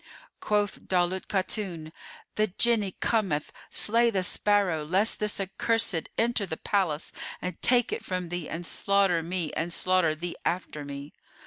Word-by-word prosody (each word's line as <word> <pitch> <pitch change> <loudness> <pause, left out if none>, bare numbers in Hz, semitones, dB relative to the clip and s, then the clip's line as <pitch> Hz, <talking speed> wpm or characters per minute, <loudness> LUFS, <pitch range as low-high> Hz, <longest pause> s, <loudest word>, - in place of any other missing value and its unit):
Quoth 205 -1 0
Daulat 185 0 +1
Khatun, 185 -5 -2 0.4
"The 215 0 +2
Jinni 210 0 +1
cometh; 190 -10 +1 0.2
slay 235 +2 +4
the 195 -4 0
sparrow, 190 -5 +2
lest 190 +8 +1
this 210 -1 -1
accursed 195 -2 0
enter 230 -3 +1
the 160 - -4
palace 180 -7 -1 0.3
and 180 -2 -5
take 245 -1 +4
it - - -4
from 180 -2 -3
thee 175 -2 -4
and 170 +1 -5
slaughter 195 -2 +2
me 170 -1 -2
and 165 +2 -2
slaughter 180 -3 +2
thee 170 +2 -4
after 170 -4 -2
me." 140 0 -8
185 Hz, 145 wpm, -28 LUFS, 165-205 Hz, 0.4 s, slay